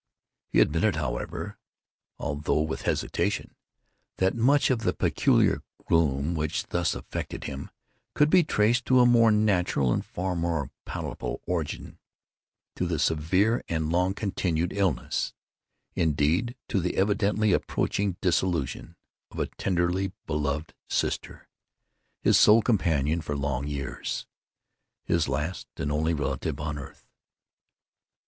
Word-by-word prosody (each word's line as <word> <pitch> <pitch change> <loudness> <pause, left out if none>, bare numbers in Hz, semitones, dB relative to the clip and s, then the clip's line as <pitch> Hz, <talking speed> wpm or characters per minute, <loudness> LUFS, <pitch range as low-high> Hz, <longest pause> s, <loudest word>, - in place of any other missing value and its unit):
He - - +3
admitted, 85 +5 +2
however, 65 -6 -4 0.6
although 75 +1 0
with 80 0 -4
hesitation, - - -1 0.6
that 95 0 +2
much 135 +5 +3
of 125 - +1
the 90 -5 0
peculiar - - +2 0.3
gloom 75 -1 +2
which 75 -2 -2
thus 85 -3 0
afflicted - - -5
him 70 +1 -6 0.5
could 150 +1 +4
be 180 -2 +6
traced 120 -3 +2
to 130 -1 +4
a 125 - +7
more 120 -2 +6
natural 90 - +2
and - - -1
far 90 0 -3
more 85 -5 -1
palpable - - -4
origin—to 90 +1 -6
the 85 -2 -1
severe 85 - +2
and 80 -1 -1
long 90 +2 +1
continued 90 -5 -1
illness—indeed 85 - -1
to 100 - 0
the 90 0 -2
evidently 105 +1 +2
approaching 100 -3 0
dissolution—of 85 -3 -2
a - - +1
tenderly 90 +1 0
beloved 75 0 -2 0.2
sister—his - - -2
sole 110 +1 +7
companion 85 - +1
for 75 -2 -3
long 70 -1 -2
years—his 75 +3 -5
last 80 +4 -3
and 75 - -2
only 80 +2 +1
relative 70 0 -2
on 75 0 -3
earth. 65 - -11
85 Hz, 115 wpm, -27 LUFS, 75-100 Hz, 0.6 s, a